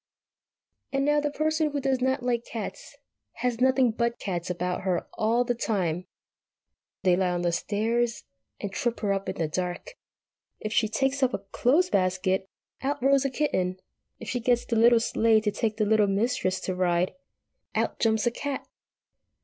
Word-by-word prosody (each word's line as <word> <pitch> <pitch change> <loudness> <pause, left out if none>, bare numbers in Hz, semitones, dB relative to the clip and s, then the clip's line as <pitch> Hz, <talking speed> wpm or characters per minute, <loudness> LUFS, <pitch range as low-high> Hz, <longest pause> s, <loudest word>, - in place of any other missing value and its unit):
And 275 0 +1
now 295 0 +3
the 295 0 0
Person 310 +1 0
who 290 -1 -2
does 265 -2 0
not 260 0 +1
like 240 -1 -2
eats 365 - -6 0.4
has 250 -1 -2
nothing 260 -2 +4
but 235 +1 -1
cats 180 -4 -3
about 180 0 -2
her 185 -2 -1
all 230 +3 +2
the 245 - 0
time. 185 -7 -1 1.0
They 180 -2 +5
lie 185 0 +1
on 175 0 -1
the 175 - +2
stairs 225 +6 0 0.4
and 205 - -4
trip 240 +2 -2
her 200 -2 +1
up 195 0 -3
in 190 - -3
the 160 - -1
dark. 180 - -4 0.6
If 215 0 -4
she 220 - +3
takes 270 +5 0
up 255 -1 +2
a 200 - -8
clothes 330 +9 +3
basket, 185 +1 +1 0.3
out 280 +2 -1
rolls 275 0 +4
a - - +2
kitten. 185 -10 -1 0.4
If 230 - -9
she 245 - -1
gets 240 0 +1
the 235 - -1
little 230 +1 +6
sleigh 225 -1 +3
to 210 -1 0
take 215 +1 -2
the 215 - +2
Littlest 205 -2 +3
Mistress 200 -5 0
to 185 - -2
ride, 180 0 +1 0.6
out - - 0
jumps 220 -1 +2
a 240 - +3
cat. 280 +2 -4
225 Hz, 180 wpm, -27 LUFS, 190-255 Hz, 1.0 s, little